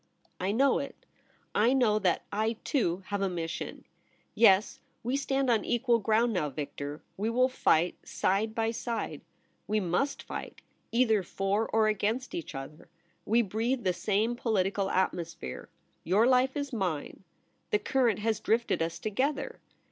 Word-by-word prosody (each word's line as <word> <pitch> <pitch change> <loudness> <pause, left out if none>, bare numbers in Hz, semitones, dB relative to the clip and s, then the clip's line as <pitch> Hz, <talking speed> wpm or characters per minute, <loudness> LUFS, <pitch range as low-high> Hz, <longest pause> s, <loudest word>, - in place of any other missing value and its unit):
' - - -38
I - - +2
know 270 +5 +3
it. 275 0 -7 0.5
I 230 +4 +4
know 230 -5 +3
that 185 -4 +1
I, 220 +2 0
too, 190 - 0
have 205 -1 -1
a 195 - +1
mission. 165 -2 -5 0.5
Yes, 205 -3 +4 0.2
we 245 +3 0
stand 275 -1 0
on 220 -3 +2
equal 240 0 +2
ground 225 +2 +2
now, 160 -6 0
Victor. 145 +1 -6
We 210 +3 0
will 250 +2 +3
fight 175 -9 +2
side 215 +3 0
by 225 0 +1
side. 230 0 -4 0.5
We 215 0 +1
mus^ 195 +10 0
fight - - -7 0.2
— - - -43
either 225 -3 +3
for 195 +4 -1
or 220 -1 +3
against 215 - -1
each 340 - -5
other. 135 +3 -8 0.4
We 235 +3 +4
breathe 230 +5 -1
the 185 -2 +2
same 215 +6 0
political 200 -4 0
atmosphere. 170 - -2 0.3
Your 200 +7 +3
life 260 +2 +3
is 285 -2 -3
mine. 185 -6 -3 0.5
The - - +3
current 240 -2 +1
has 220 0 0
drifted 230 -5 +1
us 165 0 -1
together. 260 +8 -2
215 Hz, 155 wpm, -29 LUFS, 190-240 Hz, 0.5 s, I